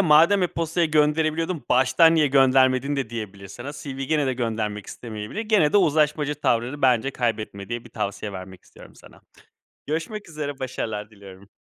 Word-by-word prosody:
"madem 170 +3 +5
e-postayla 170 -1 0
gönderebiliyordun, 155 +1 +1
baştan 130 +6 +5
niye 155 -2 +4
göndermedin" 135 0 +3
de 135 -5 -3
diyebilir 100 -4 -7
sana. 120 +8 -8
CV'yi 140 -2 -6
gene 150 -1 +1
de 130 - +1
göndermek 110 -4 -3
istemeyebilir. 110 - -7
Gene 215 -9 +2
de - - +5
uzlaşmacı 150 -4 +2
tavrını 130 0 -1
bence 130 0 +3
kaybetme 110 -6 -3
diye 120 0 -4
bir - - -14
tavsiye 105 -1 -4
vermek 95 -1 -9
istiyorum - - -16
sana. - - -17 0.7
Görüşmek 170 +7 -4
üzere 145 -3 -5
başarılar 110 -5 -4
diliyorum. 100 -2 -14
135 Hz, 155 wpm, -24 LUFS, 110-155 Hz, 0.7 s, madem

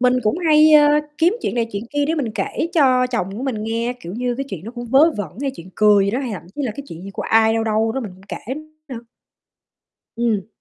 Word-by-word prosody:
Mình 250 0 +4
cũng 215 +11 0
hay, 310 -2 +5
ơ, 295 -1 +7 0.3
kiếm 345 +6 +3
chuyện - - -2
này 230 -1 0
chuyện 200 +1 -3
kia 290 0 0
để 325 - 0
mình 265 -8 -2
kể 330 - -2
cho 255 -5 +4
chồng 235 -7 -2
của 245 - -5
mình 235 -6 -2
nghe, 230 +2 -1
kiểu 175 -3 -8
như 245 0 -1
cái 275 - -3
chuyện 185 -4 -7
nó 225 - -6
cũng 240 0 -7
vớ 275 +7 +5
vẩn 195 -7 -4
hay 280 - -1
chuyện 170 +2 -11
cười 210 -2 +5
gì 200 - 0
đó, 240 - -1
hay 255 -4 -4
thậm 195 - -6
chí 290 - -3
là 235 -5 -2
cái 280 - -6
chuyện 165 +2 -9
gì 195 - -8
của - - -5
ai 225 0 +3
đâu 225 - 0
đâu 220 0 +1
đó 265 - -2
mình 210 -7 -6
cũng 190 - -19
kể 255 +5 -5 0.3
nữa. 255 - -6 1.2
Ừm. 225 -5 0
235 Hz, 265 wpm, -20 LUFS, 215-275 Hz, 1.2 s, ơ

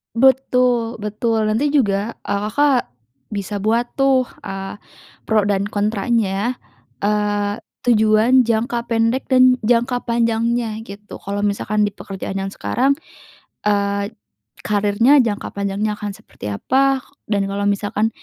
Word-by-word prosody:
Betul 250 -2 +3
betul, 215 +1 0
nanti 265 +7 +1
juga, 210 -6 +1
eee, 200 - -2
Kakak 285 -2 +3 0.5
bisa 205 0 -3
buat 225 +4 +1
tuh, 270 -2 +3 0.2
eee, 195 0 -5 0.5
pro 220 -1 +3
dan 200 -1 +1
kontranya, 210 +1 0 0.5
eee, 205 0 0 0.3
tujuan 225 +2 +4
jangka 235 +1 0
pendek 230 +3 +1
dan 255 0 +6
jangka 245 +2 +1
panjangnya 230 -1 0
gitu. 205 0 -10
Kalau 200 +1 -4
misalkan 205 +1 0
di - - -8
pekerjaan 195 -1 -7
yang 195 0 -3
sekarang, 265 +7 +1 0.7
eee, 200 -1 +1 0.6
karirnya 210 +7 +4
jangka 215 -4 -3
panjangnya 200 +1 -1
akan 210 0 -5
seperti 105 - -9
apa? 265 - +1 0.3
Dan 200 -2 +1
kalau 200 +1 -2
misalkan 205 +2 0
215 Hz, 120 wpm, -20 LUFS, 205-240 Hz, 0.7 s, dan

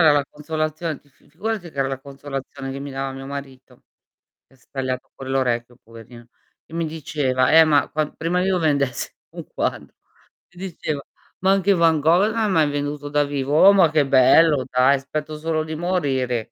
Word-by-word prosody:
la 145 -1 +2
consolazion 155 +1 -3
ti 145 - -28
f 135 - -34
figurati 190 +3 -4
che 140 - -14
era 135 - +1
la 135 -1 -4
consolazione 135 0 -7
che 135 - -6
mi 140 0 -7
dava 135 0 -4
mio 135 0 -8
marito, 135 -2 -9 0.6
che 135 - -25
s - - -29
tagliato 130 -2 -4
quell'orecchio 125 -3 -2
poverino, 115 +1 -14 0.4
e 160 - -13
mi 165 0 -1
diceva: 145 -5 0
"Eh 160 0 +8
ma 145 -3 +3
quand" 155 -1 -2
prima 175 +3 0
io 185 -1 +1
vendessi 140 -6 0 0.2
un - - -9
quadro, - - -3 0.6
mi 175 - -13
diceva: 155 -4 -4 0.4
"Ma 190 +1 +3
anche 195 0 +3
Van 165 -3 +3
gol 180 +8 +3
ha 225 -2 +1
mai 160 -6 +2
venduto 145 0 -4
da 145 0 +2
vivo." 140 -1 -3
Oh 200 - +9
ma 185 -5 +5
che 150 -2 +2
bello 140 +2 +5
dai, 130 +2 +3
spetto 150 +3 -5
solo 155 0 -1
di 155 0 -6
morire. 135 -9 -1
145 Hz, 180 wpm, -22 LUFS, 135-160 Hz, 0.6 s, Oh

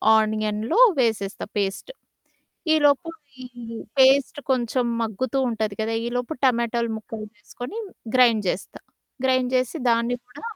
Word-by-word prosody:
ఆనియన్‌లో 215 - +1 0.2
వేసేస్తా 220 -5 0
పేస్టు. 200 - -2 0.8
ఈలోపు 290 +1 +3 0.3
ఈ - - -8 0.5
పేస్ట్ 270 +2 +5
కొంచెం 250 0 +1 0.2
మగ్గుతూ 225 +4 -2
ఉంటది 220 -2 -2
కదా! 220 +1 -1
ఈలోపు 245 +4 -2
టమాటోలు 235 -2 +1
ముక్కలు 220 0 -7
వేసుకొని 245 - -8 0.4
గ్రైండ్ 235 -4 +5
జేస్తా. 175 - -4 0.4
గ్రైండ్ 255 -1 +2
జేసి 255 +4 +1
దాన్ని 235 +1 +2
కూడా 250 +3 -14
235 Hz, 115 wpm, -24 LUFS, 220-255 Hz, 0.8 s, పేస్ట్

